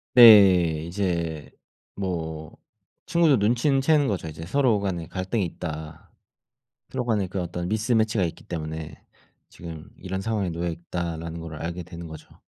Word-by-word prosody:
네. 95 -9 +8
이제 85 -6 -2 0.4
뭐 80 -5 -4 0.5
친구도 165 -6 +4
눈치는 120 +6 +2
채는 145 -1 +3
거죠 95 -5 -2
이제 80 +1 -7
'서로 125 -1 +2
간에 90 -5 -3
갈등이 95 +2 -2
있다. 80 -2 -7 0.8
서로 125 -2 -2
간에 105 -5 +1
그 95 +1 -4
어떤 85 0 -4
미스매치가 110 -2 +1
있기 85 - -4
때문에 80 -2 -5 0.5
지금 85 -1 -10
이런 95 +1 -4
상황에 105 -4 -1
놓여 85 +1 -2
있다.'라는 85 -1 -5
거를 80 -2 -7
알게 85 +1 -4
되는 85 -1 -9
거죠. 80 -1 -12
90 Hz, 300 characters per minute, -25 LUFS, 80-105 Hz, 0.8 s, 네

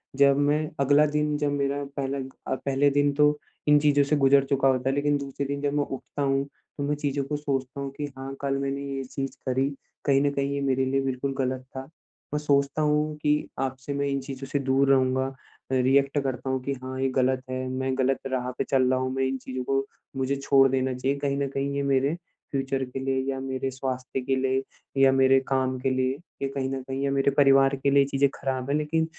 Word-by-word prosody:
जब 140 0 +5
मैं 150 - +3 0.2
अगला 145 +2 +5
दिन 150 0 0
जब 145 -1 0
मेरा 140 0 -1
पहला 140 0 -1 0.4
अ, - - +1
पहले 140 +1 +1
दिन 145 0 +4
तो 150 +1 +3 0.3
इन 150 0 +6
चीज़ों 145 -1 +4
से 140 +2 +1
गुजर 140 -1 +5
चुका 135 -1 +2
होता 130 0 +2
है। 135 - 0
लेकिन 145 0 +2
दूसरे 140 0 -4
दिन 140 0 -3
जब 145 0 0
मैं 145 0 +2
उठता 135 +2 -6
हूँ, 135 0 +1 0.3
तो 145 - -2
मैं 150 - +1
चीज़ों 145 -1 -1
को 150 +2 -3
सोचता 135 -2 -3
हूँ 140 - -4
कि 145 - -2
हाँ, 135 +1 -6
कल 135 -1 0
मैंने 140 0 -2
ये 135 - -3
चीज़ 135 +1 -5
करी, 130 +2 +1 0.4
कहीं 135 -1 +4
न 140 - +2
कहीं 140 0 -1
ये 140 - -2
मेरे 135 -1 +1
लिए 135 +1 +1
बिल्कुल 135 +1 -2
गलत 130 -1 -1
था। 130 0 -5 0.5
मैं 150 - +1
सोचता 140 0 +1
हूँ 150 0 +1
कि 150 0 +2 0.3
अब 135 0 -1
से 140 +2 -5
मैं 140 0 -1
इन 140 0 0
चीज़ों 135 0 -7
से 140 - -1
दूर 135 0 +2
रहूँगा, 130 0 +2 0.4
रिएक्ट 135 +2 +3
करता 130 0 -3
हूँ 130 0 0
कि 140 - -1
हाँ, 130 0 -5
ये 135 - +2
गलत 130 0 +1
है, 130 0 -3
मैं 130 0 -2
गलत 135 0 +1
राह 125 -1 -1
पे - - +1
चल 130 -2 +2
रहा 130 0 +2
हूँ 130 0 -1
मैं 135 - 0
इन 135 0 -2
चीज़ 130 0 -5
को 135 0 +1 0.3
मुझे 135 +1 0
छोड़ 135 0 +4
देना 130 -1 0
चाहिए 135 +2 -1
कहीं 140 -1 -1
न 140 - 0
कहीं 140 +1 -2
ये 140 - 0
मेरे, 140 +2 +2 0.4
फ्यूचर 135 -1 -1
के 125 +1 -6
लिए 135 0 0
या 135 - -4
मेरे 130 0 -3
स्वास्थ्य 130 0 -4
के 135 +1 0
लिए 130 0 +1 0.4
या 135 0 +7
मेरे 135 0 +5
काम 130 -1 0
के 135 +1 0
लिए 130 0 0 0.3
ये 135 - 0
कहीं 135 -1 -2
न 135 0 -3
कहीं 135 +1 -4
या 140 - +1
मेरे 140 0 +2
परिवार 135 -1 +5
के 140 - +4
लिए 140 0 +5
चीज़ें 140 0 +2
ख़राब 130 -1 -3
है, 140 - +2
लेकिन 155 +2 0
135 Hz, 230 wpm, -26 LUFS, 130-140 Hz, 0.5 s, या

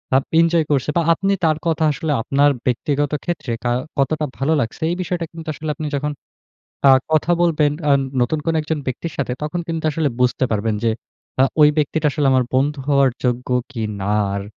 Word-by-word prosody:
আ - - +7 0.2
enjoy 165 -1 +2
করছে? 140 -1 +1
বা - - +4
আপনি 195 +4 0
তার 155 -1 +2
কথা 160 -1 +1
আসলে 150 +3 -3
আপনার 140 +4 +3
ব্যক্তিগত 145 +3 0
ক্ষেত্রে 170 -8 -3
কা 120 - 0 0.3
কতটা 150 +3 +1
ভালো 140 +4 +1
লাগছে। 115 - -5
এই - - -1
বিষয়টা 175 -2 -2
কিন্তু 165 -1 -9
আসলে 155 +2 -6
আপনি 155 +1 -4
যখন 150 +1 -2 0.8
আ - - +9 0.2
কথা 155 +3 +3
বলবেন 155 -4 +2 0.2
আ - - +6 0.3
নতুন 125 +6 +1
কোন 165 - +1
একজন 155 0 -2
ব্যক্তির 140 +6 -4
সাথে, 135 -3 -2
তখন 170 +3 -2
কিন্তু 165 -1 -3
আসলে 155 -1 0
বুঝতে 125 +1 +2
পারবেন 110 +1 0
যে 115 - +3 0.5
আ - - +7 0.2
ওই 150 - +8
ব্যক্তিটা 150 +1 0
আসলে 150 -2 0
আমার 130 -1 +3
বন্ধু 145 +3 +1
হওয়ার 140 -2 +4
যোগ্য 125 0 -1 0.2
কি 115 -4 -4 0.2
না? 100 +2 0 0.2
আর 100 - -3
145 Hz, 195 wpm, -20 LUFS, 130-160 Hz, 0.8 s, আ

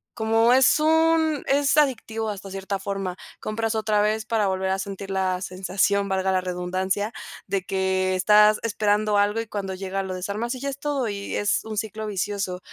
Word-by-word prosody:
como 225 +1 +3
es 265 +3 +5
un 320 -1 +3
es 280 +1 +3
adictivo, 225 -6 +1
hasta 200 -1 -7
cierta 195 +1 -3
forma. 195 -2 -4 0.2
Compras 225 +1 -2
otra 215 -1 +1
vez 215 +1 0
para 220 -2 +1
volver 190 0 -1
a 190 - +1
sentir 195 0 -6
la 185 -1 0
sensación, 195 +2 0
valga 190 0 0
la 185 - +2
redundancia, 185 +4 -2 0.3
de 195 0 -1
que 190 0 0
estás 210 +3 +5
esperando 210 -1 +1
algo 205 +2 +2
y 225 - -4
cuando 195 -2 -4
llega, 195 +1 -3
lo 190 - -5
desarmas 200 +6 -3
y - - -8
ya, 280 - -4
es 275 - -5
todo 280 -4 -1
y 200 -1 -4
es 205 - +1
un 220 -1 -6
ciclo 220 +1 -3
vicioso. 200 -2 -3
205 Hz, 185 wpm, -24 LUFS, 190-225 Hz, 0.3 s, es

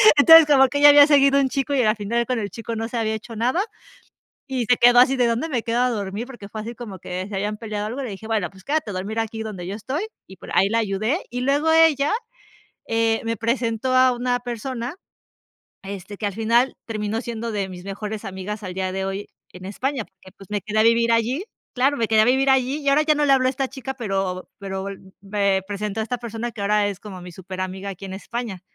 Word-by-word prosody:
Entonces, 325 +2 +9
como 275 -3 +5
que 285 +2 -2
ya 290 0 +9
había 290 0 +8
seguido 280 -2 +5
un 270 -1 +2
chico 275 +2 -1
y 270 - +3
al 215 -2 +3
final 230 +3 -1
con 255 - 0
el 205 -3 -3
chico 230 +2 -6
no 225 0 -3
se 240 - -5
había 220 -1 0
hecho 230 +2 -8
nada 250 - +1 0.8
y 260 -3 -2
se 245 +1 +4
quedó 245 0 +6
así 260 +2 +5
de: 245 -1 +3
"¿Dónde 235 +8 -1
me 245 -6 -1
quedo 235 +1 0
a 250 - +3
dormir?", 210 0 -4
porque 240 -7 -10
fue 215 +1 -6
así 230 +2 -7
como 215 -6 -8
que 185 +2 -5
se 205 - -6
habían 205 +2 -2
peleado 210 -2 -4
algo. 245 +6 -4
Le 245 - -5
dije, 200 +3 -9
bueno, 215 -5 0
pues, 190 -1 -17
quédate 295 -7 -1
a - - -6
dormir 200 +4 -3
aquí 225 0 -3
donde 190 -5 -6
yo 195 - -4
estoy 265 - -3 0.2
y 190 - -13
por - - -12
ahí 195 - +4
la 225 - +1
ayudé. 215 - 0
Y 245 +1 -4
luego 285 +5 +1
ella, 320 -1 +4 0.7
eh, 225 0 +1
me 230 0 -1
presentó 230 +2 -1
a 255 0 +5
una 245 0 -1
persona, 245 +2 -5 0.9
este, 195 +1 -8
que 210 - -3
al 200 - -3
final 230 +4 +2
terminó 215 0 -2
siendo 235 -2 -5
de 200 -2 -2
mis 180 -1 -10
mejores 205 +2 -5
amigas 195 +3 -6
al 185 -2 -6
día 190 0 -2
de 190 0 -2
hoy 195 +1 -4 0.2
en 180 0 -11
España, 255 +5 -2
porque, 190 -1 -19
pues, 195 - -14
me 205 -1 -1
quedé 215 0 -2
a - - +6
vivir 230 +1 +4
allí. 240 - +1 0.3
Claro, 270 +3 +2
me 230 -4 0
quedé 220 -1 +4
a - - +6
vivir 265 +3 +3
allí 265 +2 +2
y 280 - -1
ahora 285 +2 +4
ya 305 0 +3
no 295 0 +1
le 280 - +4
habló 260 -1 +4
a - - +3
esta 270 0 -2
chica, 265 0 -6
pero 195 -6 -3
pero 195 -1 -5 0.3
me 200 -1 0
presentó 205 +1 -3
a - - +1
esta 245 +3 -3
persona 235 0 -5
que 225 - -10
ahora 205 0 +2
es 200 -2 -5
como 200 -3 -9
mi 180 - -9
superamiga 185 +2 -6
aquí 195 0 -9
en 190 - -8
España. 215 -1 -5
225 Hz, 245 wpm, -22 LUFS, 200-255 Hz, 0.9 s, Entonces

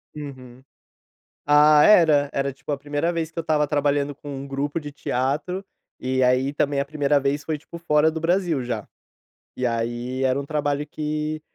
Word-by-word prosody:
Uhum. 130 -4 -9 0.8
Ah 150 0 +6
era, 155 -8 +5
era 140 0 -1
tipo 140 +2 -6
a - - 0
primeira 145 +4 -1
vez, 165 -1 -2
que 165 - -10
eu - - +2
estava 155 -2 +1
trabalhando, 145 -1 0
com 145 - -12
um 135 +1 -6
grupo 140 +3 -2
de 145 -1 -7
teatro, 145 +9 -2 0.4
e 130 0 0
aí 130 +2 +2
também, 145 -1 0
a - - 0
primeira 145 -1 +1
vez 140 +1 -1
foi 155 0 -2
tipo, 170 +3 -11
fora 155 -2 +3
do 160 0 -5
Brasil 170 -4 +1
já. 115 -4 -4 0.7
E 125 - -2
aí, 120 +2 -2
era 130 +1 +2
um 140 - -5
trabalho 145 -1 -1
que, 155 0 -3
145 Hz, 180 wpm, -23 LUFS, 135-155 Hz, 0.8 s, Ah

